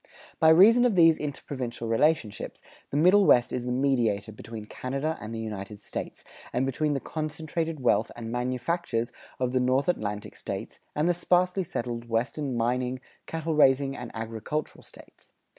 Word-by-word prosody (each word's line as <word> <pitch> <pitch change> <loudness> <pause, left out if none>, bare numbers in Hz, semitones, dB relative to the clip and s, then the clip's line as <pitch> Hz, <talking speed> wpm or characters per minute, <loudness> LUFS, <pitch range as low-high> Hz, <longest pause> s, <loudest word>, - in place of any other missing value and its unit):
By 160 - +6
reason 210 +9 +7
of 245 -5 +3
these 165 -2 +6
interprovincial 130 -5 -4
relationships, 115 -1 0 0.3
the 145 - -2
Middle 185 +5 +5
West 120 -1 +5
is 125 -1 -2
the 125 - -2
mediator 120 -6 +1
between 110 0 -9
Canada 135 +8 -3
and 110 - -6
the 115 - -4
United 105 -2 -6
States, 100 - -6 0.3
and 125 +2 0
between 145 +3 0
the - - 0
concentrated 155 +1 -3
wealth 120 -2 +2
and 115 -1 -6
manufactures 125 +1 -1 0.3
of 125 -1 0
the 130 - +2
North 130 +2 +2
Atlantic 105 -11 -2
States - - -6 0.2
and 150 +3 +1
the 175 - +4
sparsely 180 +2 +2
settled 120 -6 -4
Western 125 +3 -1
mining, 125 +2 0 0.3
cattle 160 0 -2
raising, 135 -2 +4
and 125 -3 -7
agricultural 115 +7 -4
States. - - -15
130 Hz, 160 wpm, -27 LUFS, 115-155 Hz, 0.3 s, reason